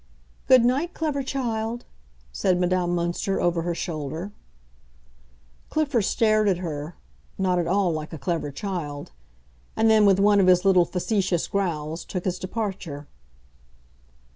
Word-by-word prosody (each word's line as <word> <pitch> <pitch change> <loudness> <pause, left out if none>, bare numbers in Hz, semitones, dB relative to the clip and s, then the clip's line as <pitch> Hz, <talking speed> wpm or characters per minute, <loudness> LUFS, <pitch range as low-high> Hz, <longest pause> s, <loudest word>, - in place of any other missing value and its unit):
"Good 255 -2 +6
night, 285 +8 0
clever 300 -3 -1
child!" 240 -3 -3 0.5
said 180 - +1
Madame 180 -1 +1
Münster, 175 +3 -1
over 175 -1 +1
her 170 0 -2
shoulder. 160 +3 -4 1.4
Clifford 285 -9 +1
stared 215 -2 +2
at 185 - +1
her—not 155 - -4
at 170 - -1
all 190 0 +2
like 155 -1 -5
a 160 - -6
clever 155 +1 -2
child; 145 -3 -5 0.6
and 220 0 +3
then, 215 -2 +5
with 195 -2 +5
one 205 0 +5
of 190 - +4
his 180 +1 +4
little 185 -3 +5
facetious 185 -2 -1
growls, 165 -5 -2
took 180 -2 -5
his 185 -1 -1
departure. 185 -7 -5
185 Hz, 135 wpm, -24 LUFS, 170-215 Hz, 1.4 s, Good